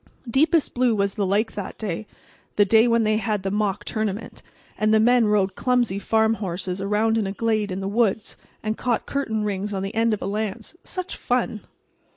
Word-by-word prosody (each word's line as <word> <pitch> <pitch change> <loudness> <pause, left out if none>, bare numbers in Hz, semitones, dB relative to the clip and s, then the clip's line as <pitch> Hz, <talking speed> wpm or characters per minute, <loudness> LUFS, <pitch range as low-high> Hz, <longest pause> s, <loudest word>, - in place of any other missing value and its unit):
Deepest 305 +6 +2
blue 245 -2 +2
was 200 -1 0
the 200 -2 -1
lake 210 +4 +1
that 200 -2 -6
day—the 210 +1 -3
day 220 +3 +5
when 230 -1 +3
they 215 0 +2
had 215 -3 -1
the 195 - -1
mock 205 -1 -1
tournament, 215 -1 -3 0.3
and 215 0 +1
the 220 - +5
men 240 0 +4
rode 200 -2 +2
clumsy 240 -4 +1
farm 220 +1 +2
horses 185 -2 -4
around 215 +3 +1
in 205 - -1
a - - -2
glade 215 0 0
in 185 +1 -3
the 195 - -3
woods 215 0 0 0.3
and 215 +1 -2
caught 240 -3 0
curtain 220 -6 -2
rings 205 0 -2
on 190 - -2
the 195 - -4
end 225 +1 +2
of 210 - 0
a - - -2
lance. 215 - -3
Such 370 -1 -5
fun! 245 -4 -1
215 Hz, 195 wpm, -23 LUFS, 200-230 Hz, 0.3 s, day